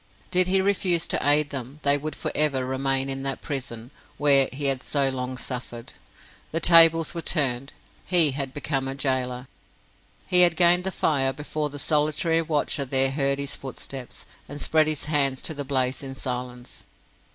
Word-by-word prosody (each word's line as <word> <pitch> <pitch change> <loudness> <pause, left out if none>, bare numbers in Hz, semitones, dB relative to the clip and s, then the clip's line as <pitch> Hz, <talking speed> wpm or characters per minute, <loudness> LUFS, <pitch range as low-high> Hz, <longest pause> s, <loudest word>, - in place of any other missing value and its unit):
Did 180 0 +5
he 190 +1 +2
refuse 185 -4 +1
to - - 0
aid 145 0 +2
them, 135 +2 -6
they 140 0 +4
would 150 +2 -5
for - - -4
ever 140 -4 +1
remain 135 +1 -1
in 135 0 -3
that 135 0 -3
prison, 125 -4 -6 0.3
where 140 -2 +4
he 140 +2 -4
had 135 -2 +3
so 140 -1 0
long 130 -1 -5
suffered. 120 -2 -7 0.6
The 165 - -1
tables 165 -1 +5
were 170 - -5
turned 135 -5 0 0.3
he 170 -5 +4
had 135 -1 -4
become 135 -1 -3
a 135 - -4
gaoler! 130 -2 -2 0.8
He 180 0 +5
had 175 -2 +5
gained 175 +1 +3
the 190 - -1
fire 135 -7 0
before 150 +1 -4
the 145 - -9
solitary 155 +3 0
watcher 150 -3 -1
there 135 0 +3
heard 140 0 +1
his 140 0 -4
footsteps, 130 -1 -7 0.2
and 145 +1 -8
spread 155 +1 +2
his 155 -2 0
hands 140 -3 0
to - - -2
the 145 -1 -4
blaze 130 -1 -1
in 135 -1 -7
silence. 125 -1 -4
140 Hz, 175 wpm, -24 LUFS, 130-155 Hz, 0.8 s, Did